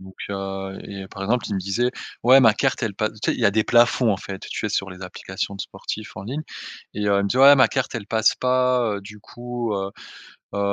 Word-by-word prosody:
donc 95 Hz, 0 st, -13 dB, 0.2 s
heu 95 Hz, 0 st, -5 dB
et 100 Hz, -1 st, -7 dB
par 100 Hz, -, -8 dB
exemple 120 Hz, +5 st, 0 dB
il 105 Hz, -, -2 dB
me 95 Hz, -, -1 dB
disait: 100 Hz, +7 st, 0 dB, 0.3 s
«Ouais 130 Hz, +3 st, +7 dB
ma 115 Hz, -4 st, +6 dB
carte 135 Hz, +3 st, 0 dB
elle 110 Hz, -4 st, -1 dB
passe» 110 Hz, +2 st, -1 dB
tu -, -, +1 dB
sais, -, -, 0 dB
il -, -, -6 dB
y -, -, +1 dB
a -, -, +4 dB
des 110 Hz, +1 st, +1 dB
plafonds 120 Hz, 0 st, +4 dB
en -, -, -1 dB
fait, 95 Hz, 0 st, -7 dB
tu -, -, -3 dB
sais 105 Hz, -, -1 dB
sur 95 Hz, -2 st, -2 dB
les 90 Hz, 0 st, -11 dB
applications 95 Hz, +2 st, -5 dB
de 100 Hz, -, -7 dB
sportifs 105 Hz, +2 st, -7 dB
en 95 Hz, -, -7 dB
ligne, 135 Hz, +8 st, -4 dB, 0.5 s
et 105 Hz, 0 st, -2 dB
heu, 100 Hz, -, +3 dB
il -, -, +1 dB
me 100 Hz, -, 0 dB
dit: 125 Hz, -, -1 dB
«Ouais 140 Hz, +2 st, +9 dB
ma 130 Hz, -, +6 dB
carte 130 Hz, -2 st, -2 dB
elle 110 Hz, -4 st, -4 dB
passe 110 Hz, 0 st, +3 dB
pas, 125 Hz, -3 st, +2 dB
heu, -, -, -6 dB
du 105 Hz, +1 st, -12 dB
coup, 120 Hz, 0 st, -5 dB
heu 95 Hz, 0 st, -3 dB, 0.6 s
heu, -, -, -2 dB
105 Hz, 265 wpm, -23 LUFS, 95-120 Hz, 0.6 s, Ouais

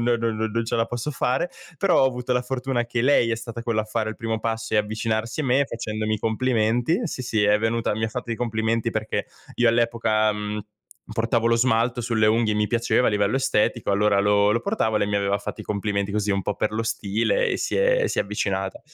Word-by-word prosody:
no 120 Hz, 0 st, +2 dB
no 115 Hz, 0 st, -1 dB, 0.2 s
non 115 Hz, +1 st, -1 dB
ce 120 Hz, -, -3 dB
la 115 Hz, -, +1 dB
posso 120 Hz, +5 st, -4 dB
fare. 130 Hz, +5 st, 0 dB, 0.3 s
Però 180 Hz, -1 st, +3 dB
ho -, -, +6 dB
avuto 125 Hz, -1 st, -2 dB
la 125 Hz, -, +2 dB
fortuna 125 Hz, -1 st, -2 dB
che 120 Hz, 0 st, -1 dB
lei 130 Hz, -3 st, +4 dB
è 115 Hz, -, 0 dB
stata 115 Hz, +1 st, -7 dB
quella 115 Hz, -2 st, 0 dB
a -, -, -9 dB
fare 110 Hz, 0 st, -2 dB
il 110 Hz, -, -6 dB
primo 115 Hz, -1 st, -3 dB
passo 115 Hz, 0 st, -3 dB
e -, -, +4 dB
avvicinarsi 110 Hz, +4 st, -2 dB
a -, -, -2 dB
me 135 Hz, +2 st, +2 dB
facendomi 110 Hz, -1 st, -3 dB
i 110 Hz, -, -3 dB
complimenti 120 Hz, -, +1 dB
sì, 135 Hz, -6 st, -4 dB
sì, 110 Hz, -3 st, 0 dB
è 105 Hz, +1 st, +4 dB
venuta 115 Hz, 0 st, 0 dB
mi 110 Hz, +1 st, -2 dB
ha -, -, -1 dB
fatto 120 Hz, +1 st, -6 dB
i -, -, 0 dB
complimenti 115 Hz, -1 st, -1 dB
perché -, -, -2 dB, 0.3 s
io 120 Hz, -1 st, +4 dB
all'epoca, 115 Hz, -2 st, +2 dB
mhmm, 105 Hz, 0 st, -4 dB, 0.5 s
portavo 115 Hz, +1 st, +1 dB
lo 115 Hz, -, +3 dB
smalto 120 Hz, 0 st, +2 dB
sulle 110 Hz, -2 st, +1 dB
unghie, 110 Hz, -1 st, +2 dB
mi 105 Hz, 0 st, +1 dB
piaceva 120 Hz, +1 st, +2 dB
a -, -, +1 dB
livello 105 Hz, +3 st, +1 dB
estetico, 130 Hz, -6 st, +1 dB
allora 100 Hz, 0 st, +3 dB
lo 100 Hz, 0 st, +3 dB
lo 115 Hz, -, +1 dB
portavo 200 Hz, -, 0 dB
e -, -, +1 dB
lei 100 Hz, -, +2 dB
mi 100 Hz, -, 0 dB
aveva 100 Hz, 0 st, +1 dB
fatto -, -, -6 dB
i -, -, -8 dB
complimenti, 100 Hz, -1 st, -2 dB
così 105 Hz, -1 st, 0 dB
un 100 Hz, 0 st, +1 dB
po' 105 Hz, -, -2 dB
per 105 Hz, -, -1 dB
lo 115 Hz, +1 st, -1 dB
stile, 115 Hz, -, 0 dB
e -, -, 0 dB
si -, -, -1 dB
è -, -, +3 dB
si -, -, -3 dB
è -, -, +4 dB
avvicinata 95 Hz, -2 st, -3 dB
115 Hz, 240 wpm, -24 LUFS, 105-120 Hz, 0.5 s, ho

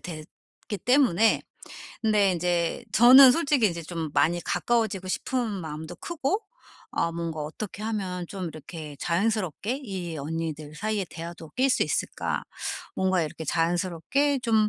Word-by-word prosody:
됐기 170 Hz, +4 st, -9 dB
때문에 245 Hz, -5 st, +4 dB, 0.6 s
근데 210 Hz, -3 st, +3 dB
인제 175 Hz, +4 st, 0 dB
저는 255 Hz, +3 st, +9 dB
솔직히 285 Hz, -8 st, +3 dB
인제 170 Hz, -1 st, -5 dB
좀 160 Hz, -2 st, -4 dB
많이 175 Hz, +2 st, +3 dB
가까워지고 220 Hz, -6 st, 0 dB
싶은 245 Hz, +4 st, -1 dB
마음도 160 Hz, -4 st, -5 dB
크고 345 Hz, +6 st, -2 dB, 0.5 s
아 170 Hz, -, 0 dB
뭔가 165 Hz, -2 st, -4 dB
'어떻게 190 Hz, +7 st, -6 dB
하면 190 Hz, -5 st, -3 dB
좀 195 Hz, -2 st, -5 dB
이렇게 155 Hz, -1 st, -9 dB
자연스럽게 210 Hz, -, 0 dB
이 180 Hz, -6 st, -5 dB
언니들 155 Hz, 0 st, -4 dB
사이의 210 Hz, -2 st, -1 dB
대화도 165 Hz, -1 st, -8 dB
낄 265 Hz, +1 st, +3 dB
수 -, -, +3 dB
있을까? -, -, -2 dB, 0.5 s
뭔가 190 Hz, -2 st, +2 dB
이렇게 160 Hz, +1 st, -5 dB
자연스럽게 175 Hz, -, +1 dB
좀 220 Hz, -3 st, +3 dB
185 Hz, 300 characters per minute, -26 LUFS, 165-225 Hz, 0.6 s, 저는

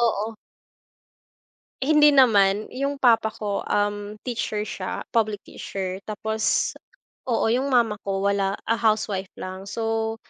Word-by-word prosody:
oo. 225 Hz, -1 st, 0 dB, 1.5 s
Hindi 300 Hz, +1 st, +6 dB
naman. 210 Hz, -6 st, +4 dB
'Yung 275 Hz, +1 st, -3 dB
papa 225 Hz, -3 st, +4 dB
ko, 205 Hz, -3 st, -3 dB
um, 205 Hz, 0 st, -1 dB
teacher 215 Hz, -4 st, -3 dB
siya, 185 Hz, -, -4 dB
public 215 Hz, -3 st, 0 dB
teacher. 190 Hz, -1 st, -5 dB
Tapos, 220 Hz, +1 st, -1 dB, 0.5 s
oo, 230 Hz, -2 st, +1 dB
'yung 260 Hz, +4 st, +1 dB
mama 230 Hz, -4 st, +3 dB
ko, 195 Hz, -1 st, -1 dB
wala 195 Hz, -1 st, +1 dB, 0.2 s
ah, 230 Hz, -, +3 dB
housewife 215 Hz, -4 st, 0 dB
lang. 185 Hz, +1 st, -6 dB
So 225 Hz, +1 st, -2 dB
220 Hz, 120 wpm, -24 LUFS, 200-230 Hz, 1.5 s, Hindi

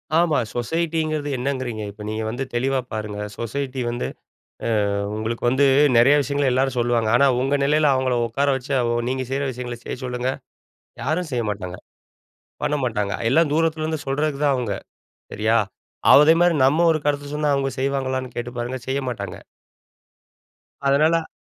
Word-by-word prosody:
ஆமா, 165 Hz, -3 st, +3 dB, 0.2 s
சொசைட்டிங்கிறது 155 Hz, +3 st, -1 dB
என்னங்கிறீங்க? 125 Hz, -4 st, -3 dB
இப்ப 105 Hz, +1 st, -14 dB
நீங்க 110 Hz, +1 st, -3 dB
வந்து 120 Hz, +4 st, -3 dB
தெளிவா 130 Hz, +3 st, +1 dB
பாருங்க. 105 Hz, -2 st, -4 dB, 0.2 s
சொசைட்டி 130 Hz, +2 st, -3 dB
வந்து, 120 Hz, +1 st, -3 dB, 0.6 s
அ -, -, 0 dB, 0.5 s
உங்களுக்கு 110 Hz, +2 st, -3 dB
வந்து 130 Hz, +3 st, +3 dB, 0.3 s
நெறைய 125 Hz, +5 st, +6 dB
விஷயங்கள 140 Hz, +1 st, 0 dB
எல்லாரும் 130 Hz, 0 st, +1 dB
சொல்லுவாங்க. 120 Hz, -2 st, +1 dB
ஆனா 140 Hz, -, +5 dB
உங்க 135 Hz, +2 st, +1 dB
நிலையில 150 Hz, +1 st, +3 dB
அவங்கள 130 Hz, -1 st, +1 dB
உட்கார 140 Hz, +5 st, 0 dB
வச்சு, 130 Hz, +1 st, -9 dB, 0.4 s
நீங்க 130 Hz, 0 st, -1 dB
செய்ற 135 Hz, +1 st, -1 dB
விஷயங்கள 120 Hz, -1 st, -6 dB
செய்ய -, -, -4 dB
சொல்லுங்க, 125 Hz, 0 st, -1 dB, 0.7 s
யாரும் 160 Hz, +3 st, -1 dB
செய்ய 120 Hz, -2 st, 0 dB
மாட்டாங்க, 95 Hz, -3 st, -5 dB, 0.9 s
பண்ண 150 Hz, 0 st, +1 dB
மாட்டாங்க, 105 Hz, -4 st, -1 dB, 0.2 s
எல்லாம் 160 Hz, +1 st, +3 dB
தூரத்துலருந்து 160 Hz, -1 st, 0 dB
சொல்றதுக்கு 145 Hz, +1 st, -1 dB
தான் 140 Hz, -2 st, +3 dB
அவங்க. 115 Hz, -6 st, -2 dB, 0.6 s
சரியா? 110 Hz, +2 st, +2 dB, 0.5 s
அதே 150 Hz, +3 st, +8 dB
மாரி 175 Hz, -1 st, +4 dB
நம்ம 160 Hz, +5 st, +3 dB
ஒரு 155 Hz, -, 0 dB
கருத்து 145 Hz, 0 st, 0 dB
சொன்னா, 150 Hz, 0 st, +1 dB
அவங்க 135 Hz, 0 st, 0 dB
செய்வாங்களான்னு 130 Hz, -2 st, -2 dB
கேட்டுப் 120 Hz, 0 st, -5 dB
பாருங்க, 120 Hz, +2 st, -3 dB
செய்ய 135 Hz, +1 st, 0 dB
மாட்டாங்க. 120 Hz, -, -5 dB, 1.5 s
அதனால 155 Hz, +4 st, +3 dB
130 Hz, 145 wpm, -22 LUFS, 120-145 Hz, 1.5 s, அதே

